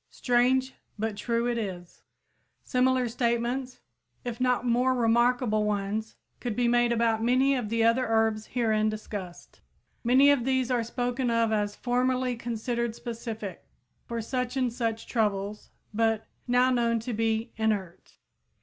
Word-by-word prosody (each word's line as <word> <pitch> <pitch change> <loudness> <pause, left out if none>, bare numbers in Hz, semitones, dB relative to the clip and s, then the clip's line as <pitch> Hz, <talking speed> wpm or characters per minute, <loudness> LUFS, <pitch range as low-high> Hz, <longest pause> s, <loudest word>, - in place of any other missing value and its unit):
Strange, 255 +2 +2 0.2
but 220 0 -2
true 235 +3 -1
it 240 -1 0
is! 180 -5 -6 0.6
Similar 255 -1 +2
statements 240 +2 -1 0.4
if 240 0 -4
not 250 -1 +2
more 250 +2 +2
remarkable 235 -1 +2
ones 210 +1 -2 0.2
could 240 -4 -3
be 245 -1 +2
made 240 0 +3
about 230 -1 +1
many 255 +4 +3
of 245 -6 -2
the 230 0 +1
other 235 +2 +3
herbs 220 -1 +1
herein 220 -3 +1
discussed. 205 -4 -7 0.4
Many 260 +4 +6
of 280 -4 +2
these 260 0 0
are 245 -2 +2
spoken 245 +2 -2
of 230 -1 +2
as 205 -1 0
"formerly 250 0 0
considered 235 0 -3
specific" 225 -5 -6 0.4
for 235 -2 -3
such 250 +2 -2
and 250 -3 0
such 225 -2 -2
troubles 210 -2 -1 0.2
but 225 0 +1 0.2
"now 250 +1 +4
known 235 -2 +2
to 240 +1 -4
be 225 +1 0
inert." 210 -6 -2
235 Hz, 140 wpm, -27 LUFS, 220-250 Hz, 0.6 s, Many